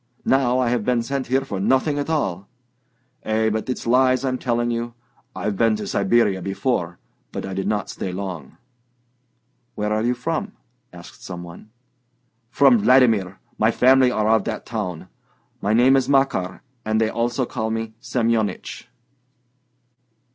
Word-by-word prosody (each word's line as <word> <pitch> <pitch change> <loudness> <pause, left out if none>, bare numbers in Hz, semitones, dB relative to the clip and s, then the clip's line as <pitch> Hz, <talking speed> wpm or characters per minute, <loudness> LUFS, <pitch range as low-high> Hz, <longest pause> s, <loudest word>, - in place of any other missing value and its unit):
Now 130 -2 +2
I 125 -2 +1
have 120 -3 0
been 120 0 +1
sent 135 +2 -3
here 135 +2 +1
for 100 -7 -4
nothing 130 +8 +1
at 145 - -3
all... 100 - -2 0.7
Eh, 110 0 0
but 110 +3 -3
it's 125 - -3
lies 130 +2 +3
I'm 130 -1 -1
telling 120 -1 0
you; 120 0 -4 0.4
I've 100 +2 -2
been 115 +1 +2
to 105 -1 -5
Siberia 100 -1 +2
before, 95 -2 -2 0.3
but - - -5
I 95 - -5
did 95 +1 -3
not 105 -1 -1
stay 95 - -5
long." 90 -7 -6 1.2
"Where 105 0 -1
are 110 - 0
you 120 +2 +1
from?" 165 - -3 0.4
asked 90 -1 -13
some 90 -2 -7
one. 85 +5 -12 0.8
"From 130 -3 +5
Vladimir. 110 -5 +3 0.2
My 110 - +4
family 130 +2 +5
are 110 -3 0
of 110 -2 +3
that 110 - -4
town. 95 -7 -5 0.5
My 100 - 0
name 130 +3 +5
is 135 0 +1
Makar, 135 -10 +1 0.2
and 110 0 0
they 110 -1 +2
also 120 +2 -1
call 110 -2 -3
me 110 0 -3
Semyonich." 115 -5 -1
115 Hz, 155 wpm, -22 LUFS, 100-125 Hz, 1.2 s, From